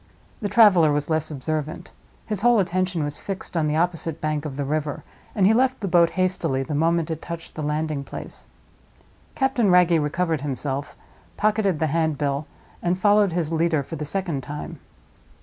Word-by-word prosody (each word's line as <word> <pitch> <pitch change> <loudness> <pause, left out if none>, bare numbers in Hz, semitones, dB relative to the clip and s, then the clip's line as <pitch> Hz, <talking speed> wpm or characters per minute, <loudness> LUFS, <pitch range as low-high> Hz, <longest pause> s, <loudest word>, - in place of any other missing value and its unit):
The 205 - -1
traveler 185 -10 +6
was 145 +2 -1
less 155 -1 0
observant; 155 +1 -4 0.3
his 210 -3 -3
whole 240 +1 +5
attention 185 -3 0
was 145 0 -3
fixed 195 -2 -6
on 160 -2 +1
the 150 - 0
opposite 165 -1 -1
bank 155 -1 -2
of 140 -3 -5
the 140 - -2
river, 150 0 -2 0.3
and 195 -4 +3
he 210 - +6
left 260 +2 +2
the 200 - -3
boat 170 -2 +4
hastily 170 -7 0
the 140 - -5
moment 165 +2 +1
it 160 - -4
touched 170 -1 -7
the 155 - -6
landing 150 -1 -2
place. - - -8 0.9
Captain 265 -6 +2
Wragge 175 -3 +5
recovered 160 0 -1
himself, 140 0 -4 0.4
pocketed 210 -4 +1
the 160 - 0
handbill, 150 -3 0 0.3
and 175 +1 0
followed 205 -1 +4
his 165 -2 -1
leader 160 -2 +1
for - - -7
the 150 - -5
second 165 -2 -2
time. 150 +3 -7
165 Hz, 175 wpm, -23 LUFS, 150-185 Hz, 0.9 s, traveler